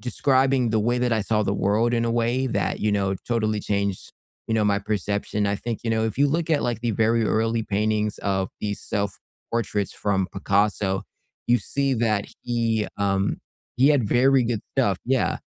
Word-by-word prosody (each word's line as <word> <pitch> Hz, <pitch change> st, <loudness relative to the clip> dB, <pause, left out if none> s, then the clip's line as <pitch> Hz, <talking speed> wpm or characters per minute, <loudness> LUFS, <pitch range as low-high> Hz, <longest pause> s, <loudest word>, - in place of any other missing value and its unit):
describing 130 Hz, -1 st, +2 dB
the 110 Hz, -1 st, +2 dB
way 120 Hz, +3 st, +1 dB
that 125 Hz, -1 st, +1 dB
I 110 Hz, -, +2 dB
saw 110 Hz, +1 st, +1 dB
the 100 Hz, 0 st, 0 dB
world, 110 Hz, +5 st, +1 dB
in 115 Hz, 0 st, +1 dB
a 115 Hz, -, 0 dB
way, 120 Hz, +3 st, +1 dB
that, 120 Hz, -, -1 dB
you 105 Hz, -, +1 dB
know, 95 Hz, -1 st, +1 dB
totally 110 Hz, -3 st, 0 dB
changed, 100 Hz, -2 st, -2 dB, 0.4 s
you 110 Hz, -, +1 dB
know, 110 Hz, -1 st, +2 dB
my 100 Hz, -1 st, +2 dB
perception 100 Hz, 0 st, -1 dB
I 100 Hz, -, +1 dB
think, 115 Hz, +1 st, -4 dB
you 115 Hz, -, 0 dB
know, 110 Hz, 0 st, +1 dB
if 110 Hz, +1 st, -3 dB
you 145 Hz, -, +5 dB
look 165 Hz, +2 st, -1 dB
at, 150 Hz, -2 st, +2 dB
like, 120 Hz, -2 st, -1 dB
the 120 Hz, 0 st, 0 dB
very 115 Hz, +2 st, +2 dB
early 115 Hz, +1 st, +1 dB
paintings 105 Hz, 0 st, -1 dB
of 95 Hz, -2 st, -1 dB
these 105 Hz, -1 st, -3 dB
self-portraits 105 Hz, 0 st, -3 dB
from 95 Hz, -2 st, 0 dB
Picasso, 100 Hz, 0 st, 0 dB, 0.4 s
you 120 Hz, 0 st, +5 dB
see 140 Hz, +1 st, -1 dB
that 110 Hz, -3 st, 0 dB, 0.2 s
he, 115 Hz, -3 st, 0 dB
um 100 Hz, -1 st, 0 dB, 0.4 s
he 130 Hz, +3 st, +5 dB
had 130 Hz, -8 st, +2 dB
very 130 Hz, +2 st, +4 dB
good 115 Hz, -1 st, -1 dB, 0.2 s
stuff, -, -, +2 dB
yeah. -, -, +1 dB
110 Hz, 190 wpm, -24 LUFS, 100-120 Hz, 0.4 s, you